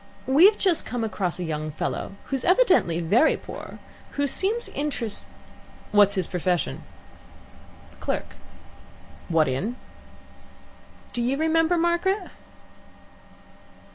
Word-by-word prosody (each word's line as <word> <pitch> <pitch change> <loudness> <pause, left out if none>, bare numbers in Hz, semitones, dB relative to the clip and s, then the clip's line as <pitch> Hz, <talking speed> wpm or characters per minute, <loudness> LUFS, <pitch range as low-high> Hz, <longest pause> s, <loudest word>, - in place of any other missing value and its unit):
We've 345 +11 +6
just 365 -5 +2
come 245 -2 -3
across 185 -5 -2
a 180 - -4
young 155 -2 -3
fellow, 155 +5 -4
who's 270 -2 -3
evidently 360 - +3
very 225 - +3
poor, - - -9
and - - -11 0.3
who 285 - 0
seems 415 - -1
interest 275 -7 -4 0.3
" - - -23
"What's 205 -1 +5
his 185 -2 +1
profession?" 180 - -1 1.2
"Clerk." - - -3 0.9
"What 160 -3 +3
in?" 180 - -2 1.4
"Do 240 - -1
you 255 +3 0
remember, 325 +2 +2
Margaret?" 345 +3 0
245 Hz, 110 wpm, -25 LUFS, -, 1.4 s, We've